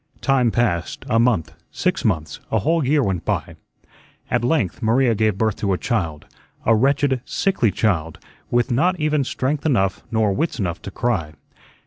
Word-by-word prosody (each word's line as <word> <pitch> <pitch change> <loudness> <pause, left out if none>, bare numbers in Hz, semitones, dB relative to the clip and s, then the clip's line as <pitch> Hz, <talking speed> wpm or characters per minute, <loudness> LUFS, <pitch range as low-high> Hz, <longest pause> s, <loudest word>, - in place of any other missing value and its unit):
Time 135 -4 +3
passed, 110 -8 -1
a 115 - +3
month, 100 -10 +1 0.2
six 180 -3 -1
months, 80 - -1
a - - +2
whole 165 +1 +1
year 145 +2 +2
went 95 -6 -1
by. - - -2 0.8
At 120 -1 +1
length 120 - 0
Maria 120 +2 +3
gave 110 -2 +1
birth 110 -1 0
to 100 -2 0
a - - 0
child, 85 - -2 0.4
a 115 - +5
wretched, 135 +2 +2
sickly 190 - +1
child, 85 -5 0 0.3
with 120 +1 +1
not 175 +9 +2
even 150 -2 +1
strength 135 +3 -2
enough 95 -11 +1
nor 110 -3 +1
wits 160 - -1
enough 90 -6 -3
to - - -7
cry. 95 -8 -2
115 Hz, 165 wpm, -21 LUFS, 95-135 Hz, 0.8 s, a